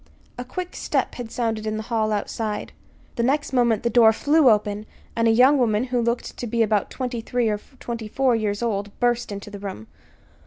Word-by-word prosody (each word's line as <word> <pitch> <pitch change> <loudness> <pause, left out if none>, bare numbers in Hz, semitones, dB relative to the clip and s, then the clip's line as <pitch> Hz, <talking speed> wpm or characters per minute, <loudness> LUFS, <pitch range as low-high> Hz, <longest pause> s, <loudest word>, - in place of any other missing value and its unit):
A 245 - -5
quick 360 +8 -6
step - - -1
had 245 -3 -6
sounded 225 -2 -2
in 215 0 -1
the 220 - -4
hall 220 -2 0
outside. 210 +1 -3 0.5
The - - +1
next 275 +4 0
moment 235 -4 +2
the 235 - +2
door 225 -1 +7
flew 290 +4 +4
open 210 -1 +1 0.3
and 230 0 +2
a - - +5
young 260 +5 +5
woman, 220 -2 +2
who 250 -1 0
looked 235 +1 -2
to 240 - -4
be 230 +1 +2
about 210 -2 +1
twenty 250 -3 -4
three 240 0 0
or 210 -1 -1 0.2
twenty 230 -2 -5
four 255 +2 +2
years 210 0 -1
old, 205 -3 -3
burst 240 -2 +1
into 200 +1 -7
the 205 - -8
room. 195 - -7
230 Hz, 205 wpm, -23 LUFS, 215-245 Hz, 0.5 s, door